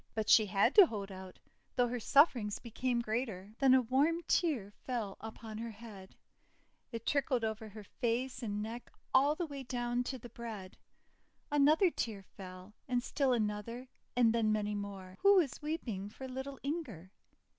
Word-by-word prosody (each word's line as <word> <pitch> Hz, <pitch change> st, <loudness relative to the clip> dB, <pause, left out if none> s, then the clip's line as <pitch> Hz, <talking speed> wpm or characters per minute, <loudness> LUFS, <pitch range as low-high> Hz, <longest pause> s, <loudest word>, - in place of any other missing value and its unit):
But 220 Hz, -1 st, -1 dB
she 215 Hz, -2 st, +7 dB
had 200 Hz, 0 st, +3 dB
to 405 Hz, -5 st, +9 dB
hold 200 Hz, -5 st, -5 dB
out, 190 Hz, -1 st, -9 dB, 0.4 s
though 245 Hz, -1 st, +3 dB
her 245 Hz, +1 st, -3 dB
sufferings 240 Hz, -5 st, +4 dB
became 240 Hz, +1 st, -1 dB
greater. 215 Hz, -4 st, -3 dB
Then 265 Hz, -2 st, +6 dB
a 260 Hz, -, +4 dB
warm 290 Hz, +8 st, +2 dB
tear 270 Hz, -, +1 dB
fell 230 Hz, -6 st, -3 dB
upon 220 Hz, 0 st, -8 dB
her 230 Hz, 0 st, -4 dB
head; 205 Hz, -3 st, -11 dB, 0.8 s
it 230 Hz, -1 st, -6 dB
trickled 270 Hz, -4 st, +1 dB
over 220 Hz, 0 st, -3 dB
her 210 Hz, +1 st, -10 dB
face 250 Hz, +4 st, -2 dB
and 210 Hz, -2 st, -2 dB
neck 230 Hz, +2 st, -7 dB, 0.2 s
all 280 Hz, +3 st, +5 dB
the 345 Hz, -, -2 dB
way 285 Hz, -3 st, -7 dB
down 240 Hz, -1 st, -1 dB
to 260 Hz, -, -3 dB
the 240 Hz, 0 st, -11 dB
bread. 220 Hz, -5 st, -8 dB, 0.8 s
Another 305 Hz, +5 st, +5 dB
tear 210 Hz, -9 st, -3 dB
followed, 185 Hz, +1 st, -11 dB
and 245 Hz, -2 st, 0 dB
still 275 Hz, -1 st, +1 dB
another, 230 Hz, +2 st, -2 dB, 0.3 s
and 235 Hz, -2 st, +4 dB
then 225 Hz, -2 st, +2 dB
many 210 Hz, -1 st, 0 dB
more. 195 Hz, -2 st, -6 dB
Who 400 Hz, 0 st, +7 dB
was 325 Hz, -9 st, +2 dB
weep 305 Hz, -1 st, -3 dB
ing 200 Hz, -2 st, -4 dB
for 260 Hz, +5 st, -8 dB
little 265 Hz, +2 st, -6 dB
Inger? 260 Hz, -, -4 dB
235 Hz, 170 wpm, -34 LUFS, 210-265 Hz, 0.8 s, to